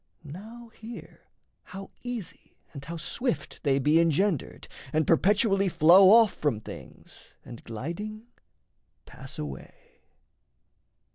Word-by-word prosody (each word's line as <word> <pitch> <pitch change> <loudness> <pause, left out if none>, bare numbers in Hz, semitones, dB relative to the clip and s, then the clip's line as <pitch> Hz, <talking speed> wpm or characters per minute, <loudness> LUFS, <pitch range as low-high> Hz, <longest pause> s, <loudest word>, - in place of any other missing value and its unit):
Now 220 +10 -11
[hear] 225 +1 -12 0.3
how 195 +1 -10
easy 245 -6 -7 0.2
and 140 -2 -9
how 165 +4 -7
swift 240 - -3
they 140 -3 +1
be 150 +4 +3
Engendered, 165 0 0 0.2
and 155 +1 +1
perpetually 195 +3 +3
flow 175 +3 +7
off 225 -1 +6
From 145 -8 -1
things - - -12
and 120 -2 -11
gliding 170 - -6 0.8
pass - - -10
away.... 70 -3 -10
175 Hz, 110 wpm, -27 LUFS, 150-215 Hz, 0.8 s, flow